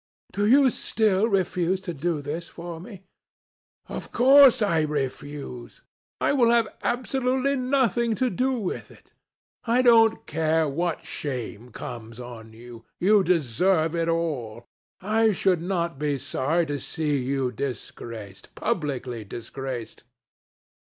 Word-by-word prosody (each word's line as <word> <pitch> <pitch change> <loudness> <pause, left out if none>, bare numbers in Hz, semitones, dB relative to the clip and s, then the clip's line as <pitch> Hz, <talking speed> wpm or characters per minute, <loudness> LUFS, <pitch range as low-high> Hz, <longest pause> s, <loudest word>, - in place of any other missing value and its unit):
"Do 205 +1 0
you 265 +2 +6
still 215 -2 +1
refuse 185 -3 0
to 175 -2 -5
do 155 0 -2
this 160 +4 -5
for 170 -1 -8
me?" 190 +1 -11 0.8
"Of - - -7
course 260 -2 +7
I 170 -6 +2
refuse. 145 -3 -5 0.4
I - - +2
will 245 -4 +4
have 235 -2 +4
absolutely 260 +2 0
nothing 250 -4 +1
to 255 +3 0
do 255 +8 0
with 215 -8 -4
it. - - -20 0.5
I 245 +2 +3
don't 225 -2 +5
care 160 0 +1
what 165 +3 -2
shame 125 -4 -5
comes 115 0 -8
on 120 -2 -9
you. 115 0 -12 0.2
You 200 +2 +4
deserve 165 - +2
it 165 0 0
all. 130 -9 -2 0.4
I 220 +3 +3
should 185 -2 +1
not 170 -4 -2
be 145 -2 0
sorry 160 +6 0
to 145 -2 -3
see 150 -2 -1
you 130 -1 -1
disgraced, 115 -5 -7
publicly 130 - -2
disgraced. 120 +3 -7
165 Hz, 130 wpm, -25 LUFS, 135-215 Hz, 0.8 s, course